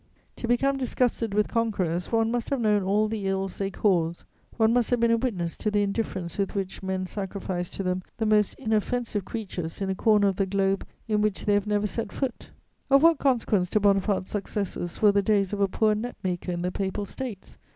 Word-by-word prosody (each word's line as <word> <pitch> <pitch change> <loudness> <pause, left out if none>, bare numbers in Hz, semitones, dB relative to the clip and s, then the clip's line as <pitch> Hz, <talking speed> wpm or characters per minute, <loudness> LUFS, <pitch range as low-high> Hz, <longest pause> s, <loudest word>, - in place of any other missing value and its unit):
To 235 - -4
become 275 +3 +2
disgusted 245 -4 0
with 210 0 +3
conquerors, 190 -7 -1
one 225 -1 +2
must 240 -1 -2
have 275 - 0
known 210 -3 +3
all 205 +3 +2
the 210 -2 -3
ills 195 -1 -2
they 195 -1 0
cause, 175 -4 0 0.3
one 225 0 +4
must 245 -2 +2
have 245 - +2
been 235 0 +3
a 230 - +4
witness 190 -9 -2
to 215 - -1
the 205 0 +2
indifference 200 -4 -3
with 195 0 -1
which 195 -1 -3
men 190 -1 -2
sacrifice 190 -2 -4
to 195 - -5
them 185 0 -1 0.2
the 225 - 0
most 210 -1 +3
inoffensive 220 -1 -1
creatures 185 -7 -5
in 195 -1 -1
a - - +1
corner 210 -1 +4
of 195 -1 0
the 195 - +1
globe 195 0 0 0.2
in 210 -1 +1
which 210 -2 0
they 205 - +3
have 205 0 +1
never 210 0 +1
set 230 +3 -3
foot. 265 -3 -4 0.4
Of 275 +2 +5
what 330 -2 +6
consequence 225 -9 +2
to 215 - +2
Bonaparte's 195 -1 +2
successes 200 -3 -3
were 210 - +8
the 200 0 +3
days 200 -1 +1
of 205 - -1
a 200 - +4
poor 215 +3 +2
net 235 +4 -4
maker 180 -1 -2
in 175 0 -3
the 180 - -1
Papal 195 +2 -2
States? 225 -2 -7
205 Hz, 215 wpm, -26 LUFS, 190-225 Hz, 0.4 s, were